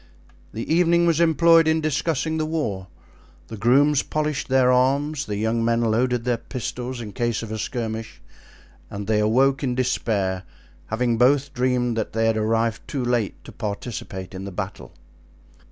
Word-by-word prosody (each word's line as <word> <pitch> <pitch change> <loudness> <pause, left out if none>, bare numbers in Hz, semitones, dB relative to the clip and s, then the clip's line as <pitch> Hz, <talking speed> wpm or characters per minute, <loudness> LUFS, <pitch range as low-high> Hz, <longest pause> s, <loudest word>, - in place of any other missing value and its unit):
The 115 - -5
evening 170 0 +4
was 165 -2 +2
employed 165 0 +5
in 160 0 +3
discussing 160 +1 -1
the 155 - 0
war; 110 - -3 0.6
the 115 - -6
grooms 135 +7 +3
polished 150 -1 -2
their 130 -1 +4
arms; 140 +4 +1
the 105 -1 -3
young 110 +2 0
men 115 0 +2
loaded 120 +2 +1
the 120 -1 0
pistols 125 +1 -5
in 105 -3 -7
case 115 +2 -1
of 110 - -7
a 110 - -4
skirmish, 110 -1 -4 0.7
and 100 0 -6
they 105 +1 +1
awoke 130 +6 +2
in 125 -2 0
despair, 105 -7 0 0.5
having 115 +1 0
both 135 +3 +3
dreamed 125 -2 0
that 110 - -3
they 115 +1 +1
had 115 0 +2
arrived 110 +1 0
too 130 -4 -3
late 120 -4 -1
to - - -11
participate 100 -3 -6
in 95 +1 -6
the 100 - -6
battle. 60 -8 -6
120 Hz, 165 wpm, -23 LUFS, 110-140 Hz, 0.7 s, employed